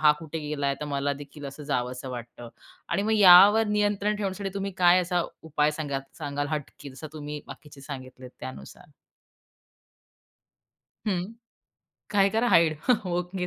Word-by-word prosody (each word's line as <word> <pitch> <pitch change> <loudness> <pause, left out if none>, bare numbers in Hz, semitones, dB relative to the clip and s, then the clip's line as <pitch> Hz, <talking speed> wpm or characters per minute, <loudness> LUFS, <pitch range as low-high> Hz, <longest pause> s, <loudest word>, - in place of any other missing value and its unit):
हा 150 -1 +6
कुठे 160 0 -6
गेला, 140 -2 -1
तर - - -3
मलादेखील 140 +1 -4
असं 140 +2 -9
जावसं 125 -2 -3
वाटतं 120 -1 -8 0.4
आणि 180 +4 0
मग 220 +2 0
यावर 205 +3 +8
नियंत्रण 205 0 +1
ठेवण्यासाठी 195 -1 -3
तुम्ही 195 0 -3
काय 180 0 +6
असा 180 -1 0 0.2
उपाय 150 -1 +1
सांगा 145 -3 -3 0.2
सांगाल 145 0 -3
हटके 150 -1 -5
जसं 135 +4 -9
तुम्ही 150 -1 -6
बाकीचे 145 0 -12
सांगितले 130 -2 -9
त्यानुसार? 65 +1 -10 2.2
हं, 185 -4 +1 0.9
काय 200 -1 +4
करा, 225 +3 +1
हाईड. 165 -6 +4 0.3
ओके 180 +1 -2
155 Hz, 135 wpm, -26 LUFS, 140-190 Hz, 2.2 s, यावर